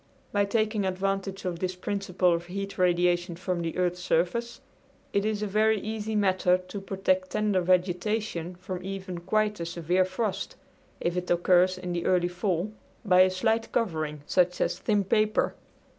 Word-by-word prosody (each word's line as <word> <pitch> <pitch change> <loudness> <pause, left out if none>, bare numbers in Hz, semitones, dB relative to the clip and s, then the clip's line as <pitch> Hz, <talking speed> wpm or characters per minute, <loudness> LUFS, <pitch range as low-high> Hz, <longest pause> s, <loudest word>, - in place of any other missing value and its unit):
By 205 0 +2
taking 215 0 0
advantage 195 +1 -2
of 175 -2 -2
this 185 0 -2
principle 185 -2 0
of 170 +1 -3
heat 195 +2 -5
radiation 175 0 +2
from 180 0 -2
the 165 0 -3
earth's 180 0 0
surface 180 +9 0 0.5
it 200 0 +1
is 215 -1 -1
a - - +1
very 215 +1 +2
easy 220 +1 -4
matter 185 -3 +3
to 185 +2 -8
protect 240 +9 0
tender 210 -6 +1
vegetation 180 0 0
from 180 0 -6
even 190 -2 -5
quite 210 +3 0
a 170 - -3
severe 175 +2 +1
frost, 190 +2 -3 0.4
if 170 0 -1
it 180 0 -3
occurs 180 +1 +4
in 180 -1 -4
the 170 -1 -2
early 175 -1 +3
fall, 180 +2 -1 0.3
by 185 -2 +6
a 185 - +6
slight 220 +5 0
covering, 155 -9 -1
such 180 +1 +2
as - - 0
thin 210 -3 +1
paper. 215 +2 +2
185 Hz, 165 wpm, -27 LUFS, 180-210 Hz, 0.5 s, by